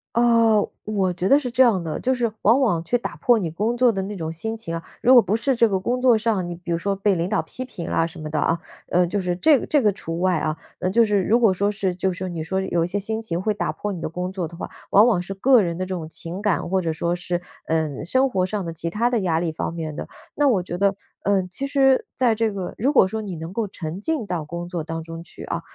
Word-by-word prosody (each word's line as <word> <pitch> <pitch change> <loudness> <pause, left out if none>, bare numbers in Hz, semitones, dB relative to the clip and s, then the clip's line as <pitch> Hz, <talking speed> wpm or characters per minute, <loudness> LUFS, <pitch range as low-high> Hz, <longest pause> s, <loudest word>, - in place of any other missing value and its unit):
哦， 230 -3 +4 0.2
我 195 -4 0
觉 180 +2 -1
得 280 - +7
是 255 -4 -3
这 255 +2 +2
样 220 -8 +4
的， 155 -2 -3
就 260 +1 +1
是 235 -3 0
往 230 +6 +5
往 205 -12 +1
去 240 +8 +1
打 240 - -6
破 240 -2 +4
你 175 -6 -2
工 215 +8 -1
作 250 -1 +5
的 195 -3 -2
那 200 +2 -5
种 160 -3 -4
心 220 +7 -4
情 165 -7 -5
啊， 165 - -5 0.2
如 255 - +6
果 245 - +9
不 205 +1 0
是 265 +3 +1
这 230 -1 +4
个 190 -2 0
工 245 +6 -1
作 245 -3 +5
上， 210 -6 0
你 175 - -5
比 175 0 -7
如 170 - 0
说 200 +2 -1
被 195 +1 +2
领 175 +1 -1
导 210 - +1
批 255 - -4
评 185 -9 -7
啊 165 - +1
什 170 0 -11
么 155 - -6
的 155 0 -2
啊， 165 +3 +1 0.3
呃， 180 0 +3
就 205 +4 -2
是 180 -2 -1
这 290 - +4
个 - - -6
这 290 -4 +2
个 210 - +4
除 165 -2 -5
外 180 -2 +2
啊， 155 0 -2 0.2
那 180 - 0
就 230 +4 +4
是 205 -2 +2
如 225 +6 +3
果 225 -5 +4
说 200 +2 +1
是 200 -3 -1
就 190 +1 -1
是 185 +1 -5
你 170 -2 -4
说 190 +4 -2
有 175 -3 0
一 170 - -1
些 195 - -2
心 220 +3 -3
情 175 -7 -3
会 215 +3 0
打 210 - -2
破 210 - -4
你 180 -4 -6
的 - - -3
工 180 +3 -4
作 185 -3 -3
的 170 - -12
话， - - -5 0.2
往 205 +3 +6
往 215 -8 +3
是 195 +2 -6
个 245 +3 +5
人 170 -2 -2
的 185 - -2
这 185 - -4
种 165 -3 -5
情 170 +4 -4
感。 205 -4 +1
或 190 0 +1
者 165 - -1
说 170 +2 -1
是， 175 0 -3 0.3
呃， 155 -3 -1
生 260 +10 +2
活 185 -6 +1
上 200 0 -3
的 165 - -4
其 165 +1 -3
它 230 +7 +1
的 240 - +1
压 165 -3 +1
力 170 -1 -1
方 160 +1 -4
面 160 -3 -5
的。 - - -6 0.3
那 290 -1 +3
我 205 -8 +3
觉 175 0 -5
得， 200 +1 +2 0.3
呃， 200 -2 +2
其 270 +9 -1
实 270 -2 +3
在 240 -4 +2
这 225 0 +1
个 190 -3 -5
如 260 +7 +2
果 190 - +6
说 220 +3 -4
你 195 -4 -5
能 160 +3 -7
够 225 0 -1
沉 170 -2 -6
浸 300 -1 -1
到 175 -4 -2
工 170 +2 -6
作 175 -3 -4
当 165 +1 -5
中 165 0 -8
去 - - -12
啊， - - -3
190 Hz, 310 characters per minute, -23 LUFS, 170-225 Hz, 0.3 s, 果